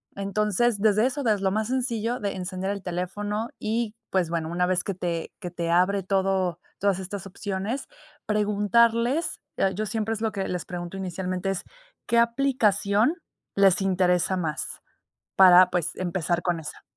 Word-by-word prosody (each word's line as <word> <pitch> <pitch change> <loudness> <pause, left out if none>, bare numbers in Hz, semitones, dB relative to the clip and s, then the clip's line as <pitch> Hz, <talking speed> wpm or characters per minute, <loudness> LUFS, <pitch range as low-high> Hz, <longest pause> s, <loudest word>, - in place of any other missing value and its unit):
Entonces, 210 +2 +1
desde 215 +1 +4
eso, 275 +2 -1
desde 215 -4 +2
lo 190 -1 +1
más 215 +1 0
sencillo, 245 -2 -1
de 200 -2 -2
encender 185 +1 -4
el 200 -1 -5
teléfono 205 +5 -3
y, 225 0 -2
pues 180 -4 +1
bueno, 165 -1 -2
una 180 +1 +1
vez 185 -1 +1
que 195 - -3
te 170 -2 -3
que 180 -4 -6
te 170 -1 -2
abre 185 +2 +3
todo 190 -2 0 0.2
todas 195 -2 +1
estas 190 0 -6
opciones 200 +6 -4 0.4
preguntarles, 230 - +2 0.2
eh, 190 0 +2
yo 215 +3 -2
siempre 220 +2 -2
es 220 - -5
lo 220 -1 0
que 195 -2 -2
les 180 -1 -3
pregunto 175 +1 -6
inicialmente 185 0 -3
es: 195 - -3 0.4
"¿Qué 235 0 +3
aplicación 235 - +2 0.4
les 195 -1 +4
interesa 185 -1 +2
más?". 160 -4 -3 0.5
Para 185 -1 +8
pues, 175 -1 -1
empezar 175 -1 -1
con 175 -2 0
esa 155 - -9
195 Hz, 165 wpm, -26 LUFS, 180-215 Hz, 0.5 s, Para